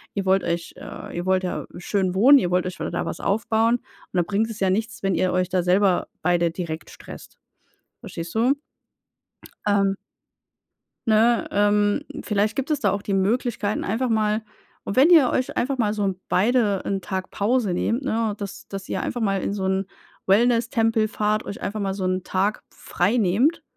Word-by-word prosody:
Ihr 200 -1 -2
wollt 190 0 +3
euch 170 0 -3
äh, - - -9
ihr 175 - -3
wollt 185 0 +2
ja 180 - -3
schön 185 0 -1
wohnen, 265 +9 +7
ihr 180 -7 -1
wollt 180 0 +2
euch 185 0 -5
wa - - -3
da - - -3
was - - -5
aufbauen. 225 +3 +2
Und 260 - -26
dann 175 - +2
bringt 210 +4 0
es 220 - -7
ja 190 - +3
nichts, 225 +3 -2
wenn 195 -1 +1
ihr 180 +2 +1
euch 185 0 +1
da 185 -2 +1
selber 185 +1 +2
beide 170 0 +2
direkt 165 -2 -5
stresst. - - -12 0.6
Verstehst 170 +4 -7
du? 240 +5 +3 1.1
Ähm 200 -1 +2 1.1
Ne, 225 +2 +3
ähm, 205 0 +2 0.2
vielleicht 210 +1 0
gibt 275 +3 -2
es 295 - +1
da 205 -6 +2
auch 200 0 -3
die 200 - -2
Möglichkeit, 215 +1 0
einfach 240 +5 -1
mal 215 0 +1 0.4
und 200 - -4
wenn 290 +7 +6
ihr 305 -8 +7
euch 255 - -1
einfach 265 +2 0
mal 210 -3 +1
so 210 - -2
'n 190 -1 -2
beide 210 -1 +2
'n 195 -1 -1
Tag 190 0 -4
Pause 215 -1 0
nehmt, 230 +8 0
ne, 225 -5 0
dass 200 -2 -7
dass 195 -1 -7
ihr - - -2
einfach 245 - -3
mal 195 -3 +1
in - - -2
so 195 -2 -3
'n 190 0 0 0.4
Wellnesstempel 225 +1 +2
fahrt 215 0 0
euch 200 - -7
einfach 210 +2 -3
mal 195 -1 -1
so 195 - -4
'n 185 0 0
Tag 195 +4 -1
frei 185 +7 -1
nehmt, 235 - +2
205 Hz, 190 wpm, -23 LUFS, 190-225 Hz, 1.1 s, wohnen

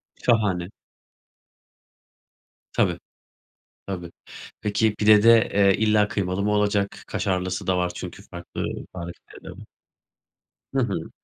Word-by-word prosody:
Şahane. 100 -7 +1 2.0
Tabii. - - +1 0.9
Tabii. 90 -3 -5 0.5
Peki, 105 +1 +1
pide 105 0 +5
de, 115 0 +7
eee, 100 -1 +5
illa 105 -1 +3
kıymalı 95 -1 -2
mı 105 - +1
olacak? 105 -1 0
Kaşarlısı 95 0 -2
da 95 - +2
var 90 -1 0
çünkü 90 +2 -8
farklı 85 -3 -7 0.3
tarifleride 85 -1 -9
var. - - -11 1.1
Hı - - +1
hı. - - -3
100 Hz, 105 wpm, -24 LUFS, 90-105 Hz, 2.0 s, de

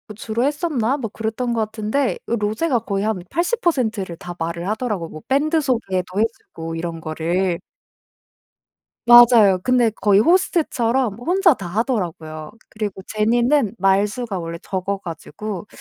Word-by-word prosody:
주로 225 +3 -2
했었나 285 -4 0
뭐 235 -6 -4
그랬던 225 +3 -2
것 225 -2 +1
같은데 220 +5 -1
로제가 230 +5 0
거의 200 -1 -1
한 215 -4 -1
80% 335 - 0
를 180 -3 -6
다 175 +1 -8
말을 170 +2 -3
하더라고요 210 -7 -2
뭐 155 - -10
밴드 305 +4 +2
소개도 195 - -1
해 - - +5 0.3
주고 165 0 -5
이런 165 0 -5
거를. 170 +3 -1 1.5
맞아요. 235 -5 +8
근데 250 -2 +3
거의 205 -2 +3
호스트처럼 260 - +2
혼자 355 +4 +3
다 195 - -8
하더라고요. 170 - -3 0.2
그리고 210 -3 -5
제니는 235 +2 +2
말수가 200 +3 +1
원래 170 -1 -5
적어 195 +1 -3
가지고 185 +3 -7
215 Hz, 290 characters per minute, -21 LUFS, 185-250 Hz, 1.5 s, 맞아요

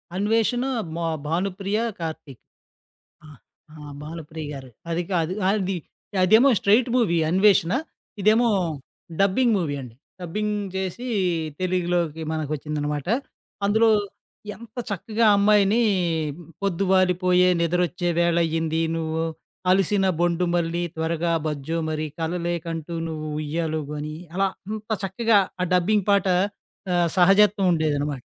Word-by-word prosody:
'అన్వేషణ' 225 +5 +1 0.3
మో 170 - -3 0.2
భానుప్రియ, 195 +5 -1 0.2
కార్తీక్. 155 -5 -7 0.8
ఆ! - - -13 0.5
ఆ! - - -13 0.3
భానుప్రియ 160 0 -7
గారు. 130 -2 -9 0.2
అది 170 +2 0
కాదు. 170 0 0 0.2
అది 195 -2 0 0.5
అదేమో 220 +9 +6
స్ట్రెయిట్ 225 +5 +3
మూవీ 205 -9 +2
'అన్వేషణ'. 190 0 +4 0.5
ఇదేమో 225 +4 +4 0.7
డబ్బింగ్ 225 +5 +3
మూవీ 155 -6 -1
అండి. 120 -3 -11 0.3
డబ్బింగ్ 210 +5 -2 0.2
చేసి, 190 +6 -3 0.5
తెలుగులోకి 175 -3 0
మనకు 155 -2 -3
వచ్చిందనమాట. 150 0 -3 0.6
అందులో 220 +3 +4 0.7
ఎంత 235 0 -15
చక్కగా 220 +4 0
ఆ - - +6
అమ్మాయిని 210 +2 +4 0.8
'పొద్దు 195 -1 0
వాలిపోయే, 180 -1 +4
నిద్రొచ్చే 175 +1 0
వేళయ్యింది, 165 -1 +1
నువ్వు 160 0 -2 0.5
అలిసిన 195 +1 +2
బొండు 175 +1 +1
మళ్ళీ 170 0 0
త్వరగా 165 +1 -1
బజ్జో 150 +2 -2
మరి, 155 0 -2
కలలేకంటూ 170 -1 -3
నువ్వు 155 -1 -5
ఉయ్యాల 155 +1 -2
ఊగు' 150 +2 -7
అని. 150 +1 -5 0.2
అలా 195 0 +2 0.2
అంత 215 0 -6 0.2
చక్కగా 210 +3 +3 0.2
ఆ - - +2
డబ్బింగ్ 200 +3 +2
పాట 200 -1 +3 0.7
ఆహ్, 175 -1 +2
సహజత్వం 195 +2 +5
ఉండేదనమాట. 145 -4 -1
175 Hz, 115 wpm, -24 LUFS, 160-200 Hz, 0.8 s, అదేమో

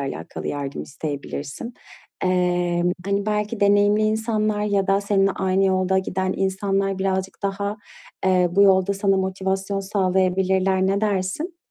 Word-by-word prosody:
alâkalı 135 -1 -5
yardım 140 -1 -4
isteyebilirsin. 145 - -6 0.5
Emm, 180 -1 +1
hani, 200 +1 -1
belki 210 +1 -1
deneyimli 205 +1 +4
insanlar 215 -1 0
ya 200 -2 +1
da 195 +1 +2
seninle 195 -1 +2
aynı 190 +1 +1
yolda 190 0 +2
giden 190 0 -1
insanlar 195 0 0
birazcık 190 +1 -2
daha, 200 +1 -2 0.5
eee, 185 -1 +3
bu 200 +2 +4
yolda 190 0 +4
sana 195 0 +1
motivasyon 190 +1 -1
sağlayabilirler, 190 -1 +1
ne 195 +1 +1
dersin? 210 - -1
195 Hz, 130 wpm, -22 LUFS, 185-200 Hz, 0.5 s, deneyimli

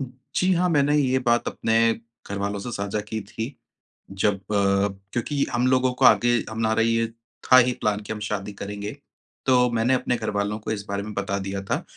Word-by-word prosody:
जी 135 +8 -2
हाँ, 180 +1 +2
मैंने 145 -1 +3
ये 130 -2 +2
बात 120 -1 +1
अपने 115 0 +2 0.4
घरवालों 100 0 -2
से 120 - -5
साझा 100 0 -2
की 110 0 -3
थी 115 +6 -5 0.6
जब 100 +1 +1
अ 95 +2 -13 0.6
क्योंकि 140 +4 0
हम 125 +2 +2
लोगों 130 0 +3
को - - +2
आगे 120 0 +5
हमारा 110 0 0
ये 115 0 +2 0.4
था 130 - +10
ही 125 0 +5
प्लान 105 -1 +1
कि 105 +1 -5
हम 105 - -7
शादी 105 -1 -4
करेंगे। 100 +1 -6 0.5
तो 125 -1 +4
मैंने 115 +3 +2
अपने 125 -1 +1
घरवालों 105 -1 -2
को 110 - -5
इस 100 -2 -4
बारे 100 0 -2
में 105 - -7
बता 100 0 -2
दिया 95 0 -4
था 95 - -2
115 Hz, 190 wpm, -24 LUFS, 105-125 Hz, 0.6 s, था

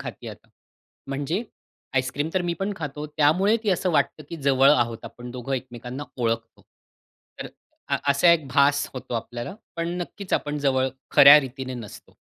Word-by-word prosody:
खाते - - -8
आता. - - -12 0.6
म्हणजे 145 - -2 0.5
आईसक्रीम 130 +4 0
तर 185 - +1
मी 175 - -1
पण 200 +2 -1
खातो 150 -1 -5
त्यामुळे 160 +9 +3
ती 210 - +1
असं 185 0 +1
वाटतं 155 -1 0
की 170 - -6
जवळ 135 0 +5
आहोत, 120 -5 +2
आपण 120 +2 -9
दोघं 125 +2 -6
एकमेकांना 125 +2 -6 0.2
ओळखतो. 115 -1 -2 0.8
तर - - -4 0.4
अ, - - +2
असा 170 +5 +5
एक 155 -4 0
भास 145 0 +3
होतो 125 -1 -6
आपल्याला. 120 - -5 0.2
पण 170 0 -2
नक्कीच 195 +2 -9
आपण 150 0 0
जवळ 130 -2 +1 0.3
खऱ्या 140 +2 +10
रीतीने 130 -1 -6
नसतो. 115 -5 -11
140 Hz, 160 wpm, -24 LUFS, 125-160 Hz, 0.8 s, खऱ्या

